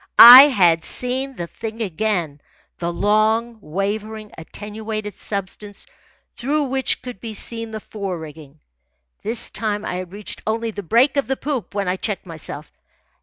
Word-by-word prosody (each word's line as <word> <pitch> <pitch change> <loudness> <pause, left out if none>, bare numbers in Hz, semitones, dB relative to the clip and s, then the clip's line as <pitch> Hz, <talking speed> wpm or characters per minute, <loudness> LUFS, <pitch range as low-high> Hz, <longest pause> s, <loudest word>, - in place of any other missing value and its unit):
I 255 +4 +12
had 175 - +3
seen 260 +5 -3
the 175 - -4
thing 220 +6 -8
again, 180 -6 -2 0.4
the 170 0 -2
long, 220 +5 +1
wavering 210 +5 -4
attenuated 210 +4 -6
substance 200 0 -6 0.5
through 290 +5 0
which 265 -1 -1
could 250 -5 -8
be 225 -2 -6
seen 230 +1 -1
the 220 0 -6
fore 195 -4 -5
rigging. 155 -2 -12 0.6
This 225 +2 -3
time 210 -2 -2
I - - -3
had 180 -1 -7
reached 205 +1 -7
only 225 +1 -1
the 205 - -6
break 240 - +2
of 280 - +1
the 265 0 -1
poop 270 -8 -4
when 200 -2 -1
I 180 +1 0
checked 205 0 -4
myself. 155 -3 -7
210 Hz, 155 wpm, -21 LUFS, 185-230 Hz, 0.6 s, I